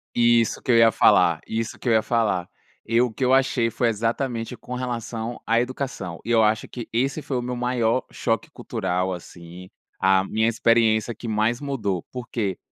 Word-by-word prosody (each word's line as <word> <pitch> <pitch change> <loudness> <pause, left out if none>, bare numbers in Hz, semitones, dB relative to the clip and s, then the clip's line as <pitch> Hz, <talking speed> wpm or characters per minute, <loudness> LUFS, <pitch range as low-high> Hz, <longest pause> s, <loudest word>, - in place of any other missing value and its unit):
Isso 120 -1 +3
que - - 0
eu 115 - +5
ia 115 0 +6
falar, 85 -5 +4
isso 110 0 -3
que - - -7
eu 120 - +4
ia 110 - +4
falar. 110 -6 0 0.4
E 115 +1 +2
o 125 -2 +1
que 120 - -4
eu 130 - +3
achei 130 -3 +2
foi 115 +1 0
exatamente 115 +2 -2
com 125 - -9
relação 120 -2 -4
à 115 +1 +3
educação. 125 -8 -4
E 120 - -3
eu 115 -1 +5
acho 110 0 +1
que 120 -2 -7
esse 135 +6 0
foi 135 -3 -3
o - - -1
meu 125 +1 -4
maior 125 0 +1
choque 115 -1 -2
cultural, 90 +1 -2
assim, 90 +1 -11 0.3
a 95 0 +4
minha 110 +3 0
experiência 115 -1 +2
que 115 - -9
mais 110 +2 +1
mudou, 110 - -2
por 125 -1 -7
quê? 100 -6 -2
115 Hz, 195 wpm, -23 LUFS, 110-125 Hz, 0.4 s, ia